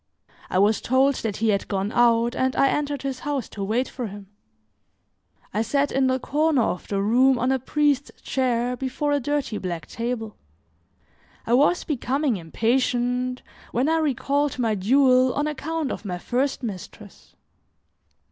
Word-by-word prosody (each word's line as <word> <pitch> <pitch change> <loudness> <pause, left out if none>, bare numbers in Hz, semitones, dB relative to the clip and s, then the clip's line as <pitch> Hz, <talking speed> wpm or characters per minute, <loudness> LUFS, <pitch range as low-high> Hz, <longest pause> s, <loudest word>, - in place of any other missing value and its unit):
I - - 0
was 205 +2 +3
told 265 +3 +3
that 210 -3 -3
he 225 0 +1
had 200 -2 0
gone 195 +1 -2
out, 235 0 +3
and 260 0 0
I 275 - +4
entered 290 -2 -2
his 270 -2 -3
house 285 -4 -3
to 200 - -6
wait 230 +6 0
for 245 -4 -5
him. 200 -1 -10 1.2
I 210 - +1
sat 280 +4 0
in 270 -1 +2
the 260 0 +2
corner 295 0 +1
of 180 - -3
the 200 - -1
room 250 +5 +4
on 250 +2 +1
a 265 - +1
priest's 285 +1 0
chair 250 -2 0
before 270 +3 -2
a 290 - +2
dirty 275 -5 -2
black 170 -4 -4
table. 230 +1 -4 1.1
I 235 - 0
was 290 +7 +3
becoming 275 -3 -1
impatient 245 +6 0 0.3
when 250 +4 +1
I 325 +1 +2
recalled 285 -1 0
my 230 -3 +1
duel 255 +5 +3
on 290 - 0
account 305 0 -3
of - - -5
my 180 -4 -4
first 260 +8 -1
mistress. 205 -1 -9
255 Hz, 160 wpm, -24 LUFS, 225-280 Hz, 1.2 s, I